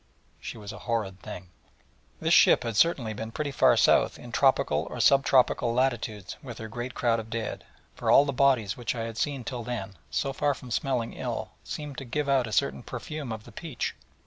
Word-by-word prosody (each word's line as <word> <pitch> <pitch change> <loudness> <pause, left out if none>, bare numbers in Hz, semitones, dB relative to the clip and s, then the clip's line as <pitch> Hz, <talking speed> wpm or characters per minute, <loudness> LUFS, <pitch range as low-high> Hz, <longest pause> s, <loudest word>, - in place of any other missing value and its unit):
She - - -7
was 105 0 -8
a - - -9
horrid 105 -5 -1
thing. 90 0 -9 0.7
This - - +2
ship - - +6
had 115 -2 -3
certainly 120 -5 +3
been 110 +1 -5
pretty 145 +3 -3
far 135 - +4
south - - +4
in - - -11
tropical - - +2
or - - -6
sub 140 0 +5
tropical 125 -3 +3
latitudes 115 -6 -1
with 120 -4 -8
her 110 - -6
great 120 +3 -6
crowd 115 -2 +2
of 110 0 -8
dead: 115 -1 -4 0.3
for - - -3
all 140 - +7
the 140 - -2
bodies 125 -7 +3
which 120 +1 -3
I 115 - -3
had 115 0 -5
seen 140 -4 -1
till 125 0 -4
then, 110 -5 -5 0.2
so 135 -1 -1
far 145 +1 +1
from 125 -3 -11
smelling 120 -2 -1
ill, - - -4
seemed 150 -3 -6
to 135 - -7
give 145 +4 -2
out 135 -3 +3
a - - -7
certain 70 -9 +1
perfume 150 -5 -6
of 110 -1 -5
the - - -13
peach. 155 -8 -4
120 Hz, 210 wpm, -27 LUFS, 110-135 Hz, 0.7 s, all